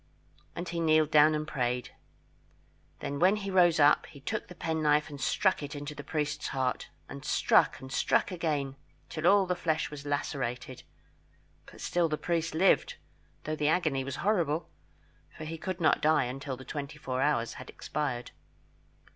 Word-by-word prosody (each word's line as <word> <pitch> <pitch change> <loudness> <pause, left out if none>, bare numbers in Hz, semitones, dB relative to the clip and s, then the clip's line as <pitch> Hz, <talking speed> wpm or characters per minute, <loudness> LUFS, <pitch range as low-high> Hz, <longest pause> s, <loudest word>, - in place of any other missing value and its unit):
And 175 +1 -4
he 170 0 -3
kneeled 155 -2 +3
down 155 0 +6
and 155 0 -3
prayed. 125 -2 -2 1.1
Then 140 0 -3
when 185 +4 +5
he 200 -2 -4
rose 175 -3 +4
up 145 0 +5
he 140 - -13
took 215 +10 -4
the 180 - -11
penknife 155 -3 +1
and 140 -2 -8
struck 190 +6 +2
it 145 +1 -6
into 145 +1 -5
the 145 - -8
priest's 150 -1 -2
heart, 130 -2 -2 0.2
and 70 0 -9
struck - - +3
and 130 0 -10
struck - - +2
again 150 -6 -2 0.3
till 160 +2 -1
all 200 0 +6
the 180 - 0
flesh 160 -4 -1
was 145 -1 -8
lacerated; 130 -3 -3 0.9
but - - -13
still 175 -2 +1
the 150 - -1
priest 170 -1 -1
lived, 190 +4 +3 0.5
though 155 - -2
the 150 -1 0
agony 155 -6 +1
was 135 0 -5
horrible, 170 - +1 0.7
for - - -7
he 160 +1 -6
could 185 +1 -4
not 160 - +3
die 155 -2 +4
until 135 +1 -5
the 130 - -11
twenty 145 0 -6
four 130 -3 -3
hours 125 -5 +1
had 130 - -11
expired. 130 -5 -4
150 Hz, 170 wpm, -30 LUFS, 140-165 Hz, 1.1 s, down